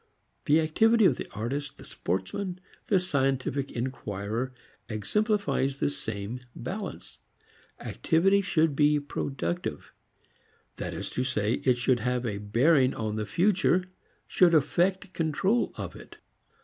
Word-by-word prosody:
The 150 +2 +5
activity 220 +8 +4
of 140 -9 +4
the - - -6
artist, 135 +6 -3
the - - -12
sportsman, 175 - -3 0.3
the 195 - +4
scientific 135 -4 0
inquirer 115 -1 -3 0.4
exemplifies 140 - 0
the 140 - 0
same 110 -1 -5 0.2
balance. 195 - -6 0.6
Activity 195 +5 +2
should 160 -6 +1
be 150 +1 +4
productive. 145 - -4 0.8
This - - -4
is - - -4
to 125 - -1
say 110 -4 0
it 125 -2 +4
should 125 0 +2
have 125 0 -1
a 105 -3 -2
bearing 130 +6 +3
on 110 -1 -2
the 105 -1 -3
future, 185 -1 +2 0.4
should 175 -2 +4
effect 185 +5 +1
control 180 +8 +1
of - - -6
it. - - -13
140 Hz, 125 wpm, -28 LUFS, 120-180 Hz, 0.8 s, The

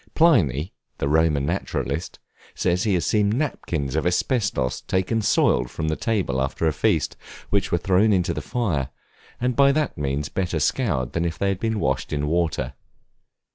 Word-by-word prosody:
Pliny, 90 - +3 0.2
the 70 - -1
Roman 75 -2 +2
naturalist, 80 -3 -3 0.4
says 90 +2 0
he 100 -3 +2
has 85 -4 0
seen 105 -2 +2
napkins 85 - -2
of 80 - +1
asbestus 90 - 0
taken 95 +5 0
soiled - - +2
from 80 +3 -3
the 80 - 0
table 95 - -1
after 70 +4 -1
a 80 - +2
feast, - - +1 0.4
which 100 -1 +1
were 85 - +3
thrown 95 +5 +3
into 90 -3 +1
the - - -4
fire, 85 - -1 0.5
and 125 0 0
by 140 0 +5
that 150 - -1
means 70 +1 -1
better 90 -3 -2
scoured 75 - 0
than 85 - 0
if 85 -2 -2
they 100 - 0
had 95 -2 -1
been 110 -1 -1
washed 65 -4 -1
with 75 -1 -1
water. 80 +1 0
85 Hz, 175 wpm, -23 LUFS, 75-105 Hz, 0.5 s, by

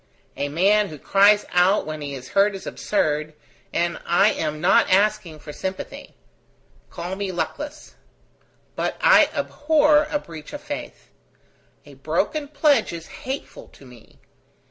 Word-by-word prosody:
A 145 - -3
man 200 +7 +3
who 155 - -9
cries 200 +6 +4
out 180 +3 +3
when 155 0 -6
he 140 -1 -5
is 130 -1 -10
hurt 200 +1 +2
is 190 - -9
absurd, 155 -5 -1 0.4
and 170 0 -1
I 195 +5 +4
am 155 -1 -3
not 175 +5 +4
asking 195 -4 +1
for 150 0 -10
sympathy. 190 +4 -7 0.7
Call 180 +2 -5
me 195 -1 -3
luckless. 295 - -5 0.8
But - - -2
I - - +6
abhor 300 0 +2
a 295 - 0
breach 160 - -11
of 290 - -6
faith. 290 - -8 0.7
A - - -14
broken 305 -2 -2
pledge 290 0 +2
is 165 -1 -7 0.2
hateful 270 - -6
to 140 - -17
me. 125 -3 -17
190 Hz, 145 wpm, -23 LUFS, -, 0.8 s, I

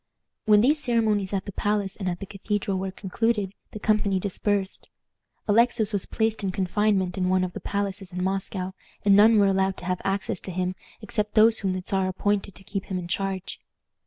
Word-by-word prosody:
When 210 -1 +6
these 295 +6 +3
ceremonies 220 -6 +1
at 195 -2 -2
the - - -5
palace 205 -1 -1
and 190 -3 -3
at 175 0 -3
the 195 - -5
Cathedral 195 -1 -2
were 190 0 -2
concluded, 200 +1 -1 0.2
the - - -8
company 210 -2 +1
dispersed. 200 0 -2 0.6
Alexis 220 0 +3
was 200 - -1
placed 220 -1 -1
in 190 - 0
confinement 190 0 0
in 185 0 +1
one 185 0 +3
of 180 -1 -3
the - - -5
palaces 200 -1 -3
in 180 0 -3
Moscow, 190 0 -2 0.3
and 200 -1 +6
none 215 +2 +7
were 205 - +5
allowed 195 -1 +1
to - - -9
have 180 -1 -1
access 195 -2 -1
to 190 - -5
him 180 +1 -1 0.3
except 210 0 -2
those 220 +1 +6
whom 190 -2 -1
the 185 0 -4
Czar 190 -1 +1
appointed 200 +1 -1
to 195 - -12
keep 195 0 -4
him 190 -2 -3
in 175 -1 -5
charge. 195 +1 -3
195 Hz, 200 wpm, -25 LUFS, 185-210 Hz, 0.6 s, none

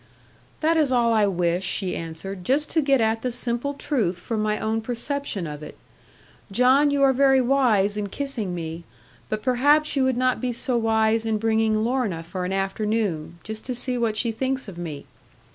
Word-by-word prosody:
'That 325 +1 +3
is 300 -4 +2
all 235 -2 +3
I 215 -2 +3
wish,' 175 -1 0
she 190 0 -1
answered; 165 +3 -6
'just 285 +8 +1
to 320 - +2
get 275 -2 +3
at 225 0 +1
the 250 - -2
simple 245 +3 -2
truth 220 - -1
from 215 +4 -3
my 215 0 0
own 220 +1 -1
perception 240 -3 -3
of 150 -1 -7
it. 150 - -10 0.7
John, 260 +7 +4
you 285 -1 +2
are 270 -1 +5
very 270 0 +4
wise 240 -6 +2
in 205 -1 -2
kissing 230 -7 -3
me; 165 0 -5 0.5
but 215 0 -3
perhaps 290 +5 +3
you 270 - +2
would 260 -2 +1
not 255 0 +1
be 250 -1 -1
so 245 +2 0
wise 225 -1 +2
in 220 -1 0
bringing 220 0 +1
Lorna 230 -9 -1
for 180 +2 -5
an 180 - -3
afternoon, 195 -4 -1
just 220 0 -7
to 250 - -2
see 250 +1 -2
what 230 -3 0
she 235 0 +1
thinks 260 +2 -2
of 195 - -8
me. 160 -5 -6
225 Hz, 195 wpm, -24 LUFS, 195-260 Hz, 0.7 s, are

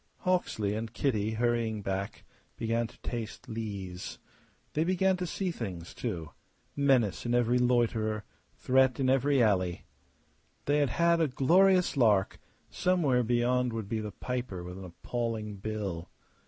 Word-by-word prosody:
Hawksley 175 - 0
and 110 +1 -4
Kitty, 110 -4 0
hurrying 115 -2 0
back, 95 0 -3 0.3
began 115 0 0
to - - -19
taste 115 -3 -5
lees. 100 -5 -5 0.6
They 155 - +2
began 185 +2 +2
to 180 0 -3
see 185 +1 -2
things, 90 - -6
too 85 -10 -4 0.4
menace 135 -8 +2
in 120 0 0
every 120 +1 +3
loiterer, 115 -3 +1 0.3
threat 130 0 +3
in 130 -1 +3
every 135 0 +3
alley. 95 -5 +1 0.8
They 145 +1 +2
had 145 -2 +2
had 170 0 +3
a 160 - +3
glorious 180 +8 +4
lark; 105 -7 +3 0.3
somewhere 165 -9 +2
beyond 120 +1 +1
would 110 -3 -4
be 110 +2 -2
the 105 -1 -4
piper 120 -5 -4
with 90 +1 -8
an 95 - -8
appalling 110 +3 -4
bill. 100 -5 -4
115 Hz, 140 wpm, -30 LUFS, 105-130 Hz, 0.8 s, glorious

